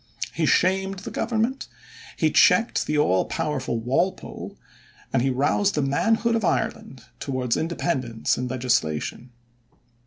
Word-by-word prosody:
He 160 -1 0
shamed 190 +3 +2
the - - -5
government, 235 +3 -1 0.5
he - - +2
checked 230 +1 +4
the 150 - 0
all 95 -11 +3
powerful 130 -6 -2
Walpole, 135 +11 -2 0.6
and - - +3
he 135 - +1
roused 145 +10 +1
the 150 - +1
manhood 225 +11 +1
of 225 - -1
Ireland 220 - -2 0.2
towards 130 -3 -1
independence 130 -8 -1
in 125 - -3
legislation. 120 -4 -1
150 Hz, 125 wpm, -24 LUFS, 125-200 Hz, 0.6 s, checked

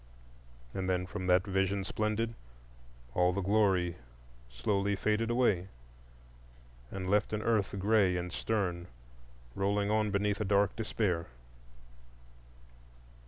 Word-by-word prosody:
And 95 -1 -2
then 90 0 0
from 90 0 -5
that 90 +2 +4
Vision 95 0 0
Splendid 110 +3 -1 0.8
all 90 0 +3
the 100 - -1
glory 95 -3 +2
faded - - -15 0.6
slowly 100 -1 +1 0.3
away, 115 -7 +2 1.2
and 95 -1 -5
left 105 +2 +2
an 105 0 -1
earth 110 -4 +1
gray 100 -2 +3
and 90 0 -4
stern 90 -5 -1 0.7
rolling 100 +3 0
on 110 0 +2
beneath 100 +1 0
a - - +2
dark 100 0 +2
despair. 105 -7 -1
100 Hz, 115 wpm, -31 LUFS, 95-105 Hz, 1.2 s, that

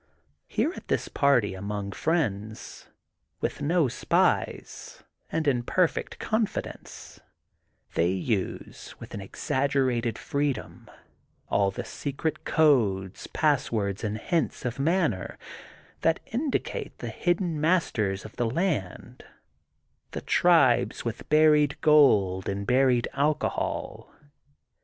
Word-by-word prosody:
Here, - - 0
at - - -11
this - - 0
party 125 -8 +2
among 100 +1 -4
friends, 110 - -2 0.5
with - - -3
no 160 +1 +2
spies, 120 - -1 0.3
and 160 -2 -1
in 125 -4 +2
perfect 175 +8 0
confidence, 220 -1 -4 0.7
they 85 +1 +2
use 95 +2 -3
with - - -10
an 100 - -5
exaggerated 130 +1 0
freedom 140 -5 -3 0.6
all 100 -1 +2
the 95 - -6
secret 145 +3 -4
codes, 110 - +2
passwords, 115 -10 0
and 105 0 -2
hints 165 +2 -1
of 125 +1 -3
manner 160 - 0 0.6
that 165 0 +2
indicate 270 +4 -2
the - - -5
hidden 175 -3 -1
masters 115 - +1
of 110 - -11
the 120 -2 0
land, 125 - -2 0.9
the - - -4
tribes - - +3
with - - -5
buried 150 -2 +4
gold 105 - +4
and 100 0 -3
buried 125 0 +3
alcohol. 145 +2 -2
130 Hz, 105 wpm, -27 LUFS, 105-155 Hz, 0.9 s, buried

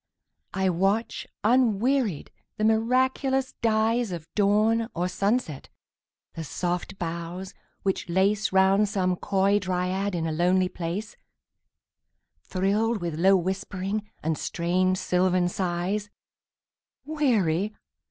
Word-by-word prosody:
I 190 0 +1
watch, 195 +6 0 0.2
unwearied, 235 - +2 0.3
the 215 - -2
miraculous 260 +4 +1
dyesOf 220 -6 +1
dawn 215 +3 +2
or 175 +2 0
sunset; 195 - -1 0.6
the 165 - -5
soft 175 +4 -3
boughs 170 +2 -5 0.3
which 195 -3 -1
laceRound 195 +2 +3
some 185 -3 0
coy 195 +2 +1
dryad 185 +1 -1
in 165 -1 -1
a 160 - -1
lonely 180 +3 +2
place, 180 +6 -5 1.2
Thrilled 210 +4 0
with 170 -3 -4
low 190 +3 +5
whispering 190 +3 -3
and 160 0 -1
strange 185 +2 0
sylvan 185 -1 +1
sighs:Weary? 205 - -3
195 Hz, 95 wpm, -26 LUFS, 180-215 Hz, 1.2 s, low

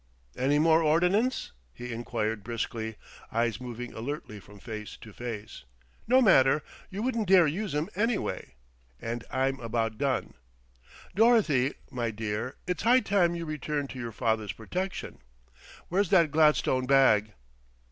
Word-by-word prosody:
"Any 140 +3 +2
more 160 +1 +4
ordnance?" 180 +10 +2 0.2
he 125 -1 -6
inquired 115 -2 -3
briskly, 110 -1 -4 0.4
eyes 115 0 0
moving 125 -1 -7
alertly 115 -3 -6
from 105 +1 -15
face 105 -1 -7
to 110 - -13
face. 110 -3 -7 0.4
"No 255 +2 +5
matter; 145 - +5 0.3
you 200 +3 -5
wouldn't 230 -4 -1
dare 185 -2 +7
use 180 +3 -2
'em 150 +3 0
anyway. 225 +2 -2 0.4
And 115 +1 -4
I'm 135 +1 0
about 115 -1 -2
done. 140 -2 -1 0.8
Dorothy, 195 - +3 0.2
my 120 -2 -2
dear, 110 +3 -4
it's 180 -1 -2
high 245 +4 +5
time 180 -5 +2
you 170 -1 -4
returned 150 -2 -3
to 130 - -8
your 120 -2 -4
father's 110 -2 -1
protection. 185 - -5 0.7
Where's 190 +1 +1
that 170 -6 +4
gladstone 150 -4 +3
bag?" 110 -6 +4
135 Hz, 135 wpm, -28 LUFS, 115-175 Hz, 0.8 s, dare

